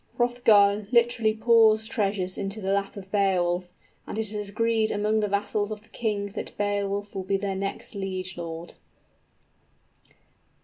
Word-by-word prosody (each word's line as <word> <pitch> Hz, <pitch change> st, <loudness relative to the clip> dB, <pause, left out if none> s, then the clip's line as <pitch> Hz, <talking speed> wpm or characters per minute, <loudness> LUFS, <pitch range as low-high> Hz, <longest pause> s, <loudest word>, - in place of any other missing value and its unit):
Hrothgar 215 Hz, -4 st, +4 dB
literally 235 Hz, -2 st, +3 dB
pours 220 Hz, -1 st, +5 dB
treasures 195 Hz, -4 st, -1 dB
into 195 Hz, +2 st, -4 dB
the 195 Hz, -1 st, -1 dB
lap 200 Hz, +1 st, -1 dB
of 190 Hz, -1 st, -10 dB
Beowulf; 180 Hz, -3 st, +1 dB, 0.4 s
and -, -, -5 dB
it 220 Hz, -1 st, -2 dB
is 210 Hz, -1 st, -4 dB
agreed 225 Hz, +1 st, +1 dB
among 210 Hz, +1 st, +1 dB
the 210 Hz, -, +1 dB
vassals 205 Hz, +1 st, -1 dB
of 215 Hz, -1 st, -6 dB
the -, -, -21 dB
king 205 Hz, -3 st, -2 dB
that -, -, -7 dB
Beowulf 205 Hz, 0 st, -1 dB
will 195 Hz, -, -3 dB
be 190 Hz, +1 st, 0 dB
their 195 Hz, 0 st, -3 dB
next 195 Hz, +1 st, -4 dB
liegelord. 185 Hz, -4 st, -5 dB
205 Hz, 145 wpm, -26 LUFS, 195-220 Hz, 0.4 s, pours